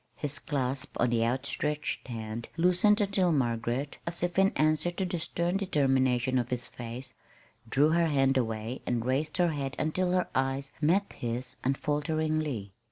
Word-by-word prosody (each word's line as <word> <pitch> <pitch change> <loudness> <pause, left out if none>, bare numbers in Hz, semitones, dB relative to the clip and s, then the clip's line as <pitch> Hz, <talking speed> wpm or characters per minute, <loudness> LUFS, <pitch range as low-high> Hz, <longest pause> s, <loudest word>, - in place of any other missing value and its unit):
His 145 -1 -3
clasp 135 -2 -2
on 120 0 +3
the 115 -1 +2
outstretched 140 +5 -2
hand 115 -1 -5
loosened 180 +5 +4
until 195 -3 +2
Margaret, 120 0 -1
as 170 0 -3
if 175 +1 +1
in 195 0 +6
answer 155 +2 +2
to 180 +2 -2
the 175 -1 -2
stern 170 +3 -1
determination 130 - +2
of 120 0 -2
his 125 -1 0
face, 125 +2 -7 0.6
drew 145 +5 +4
her 170 0 +3
hand 135 -3 +3
away 115 0 -2
and 120 -1 0
raised 140 +4 0
her 175 -1 +3
head 140 -3 -3
until 180 +4 0
her 180 -1 +2
eyes 135 +1 -1
met 185 +7 +2
his 120 +1 -4
unfalteringly. 150 -5 -1
140 Hz, 160 wpm, -29 LUFS, 125-165 Hz, 0.6 s, in